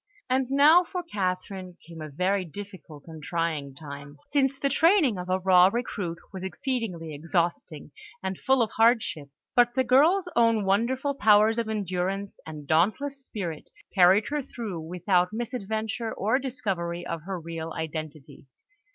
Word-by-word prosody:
And 260 0 +1
now 295 +6 +6
for 360 +1 -5
Catherine 185 - -4
came 165 -1 -10
a 155 - -6
very 185 +6 0
difficult 180 -4 -10
and 160 -2 -10
trying 155 -4 -2
time, 145 -1 -10
since 275 -2 +1
the 275 - 0
training 295 - +3
of 180 0 -6
a 185 - +2
raw 185 -1 +5
recruit 200 -7 -3 0.2
was 190 -1 -6
exceedingly 190 - -3
exhausting 165 -1 -2 0.3
and 190 -1 -3
full 265 -2 +3
of 220 - -3
hardships; 220 - 0
but 240 0 +4
the 260 - +3
girl's 310 +10 +4
own 230 -3 +3
wonderful 255 +8 +1
powers 220 -2 +4
of 230 -1 -2
endurance 195 -1 -3
and 155 -2 -8
dauntless 220 - +1
spirit 175 - -6 0.2
carried 190 +2 +5
her 295 0 -1
through 225 -9 -6
without 180 +3 0
misadventure, 220 -1 -3
or 220 +6 0
discovery 190 -10 -3
of 165 - -4
her 190 -2 -3
real 165 0 -6
identity. 155 -3 -7
195 Hz, 150 wpm, -26 LUFS, 170-240 Hz, 0.3 s, now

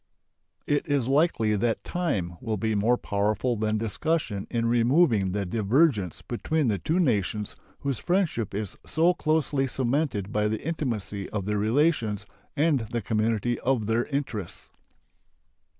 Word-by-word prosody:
It 145 +2 0
is 140 -5 +1
likely 135 -7 +2
that 115 +3 0
time 100 - -2
will 110 -1 -2
be 110 +3 0
more 110 +4 +2
powerful 105 +4 0
than 110 0 0
discussion 115 -1 -1
in 115 -1 0
removing 115 - +3
the 100 +1 -1
divergence 110 - +1
between 145 +3 -1
the 100 -3 0
two 160 - 0
nations 105 - 0 0.3
whose 140 -3 -2
friendship 170 - 0
is 105 -2 -4
so 170 +3 +2
closely 155 -4 +1
cemented 125 -5 -1
by 105 -1 +1
the 110 +4 -3
intimacy 115 - -3
of 100 -3 -3
their 105 0 0
relations 115 - +1 0.3
and 150 -1 +3
the 120 0 -3
community 110 +1 0
of 125 -4 0
their 115 +3 +1
interests. 130 - -4
115 Hz, 140 wpm, -26 LUFS, 105-145 Hz, 0.3 s, removing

